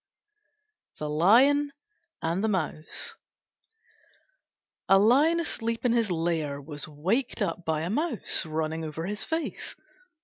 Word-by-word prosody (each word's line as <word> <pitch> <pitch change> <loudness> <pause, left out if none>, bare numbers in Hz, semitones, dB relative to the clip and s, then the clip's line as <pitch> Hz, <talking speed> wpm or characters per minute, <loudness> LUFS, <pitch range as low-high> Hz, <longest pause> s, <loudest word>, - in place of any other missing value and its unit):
THE 150 - -4
LION 255 - +4 0.5
AND 170 +5 0
THE - - +2
MOUSE 165 -6 -3 1.7
A 195 - +7
Lion 275 +11 +4
asleep 230 -7 -3
in 245 - +4
his 230 -3 +2
lair 165 -4 -1
was 145 +1 -6
waked 190 - -1
up 170 +1 -3
by 160 -2 0
a 165 - -2
Mouse 300 0 +1
running 160 0 -3
over 160 +1 -5
his 205 +3 -2
face. 320 0 -4
185 Hz, 125 wpm, -27 LUFS, 160-240 Hz, 1.7 s, A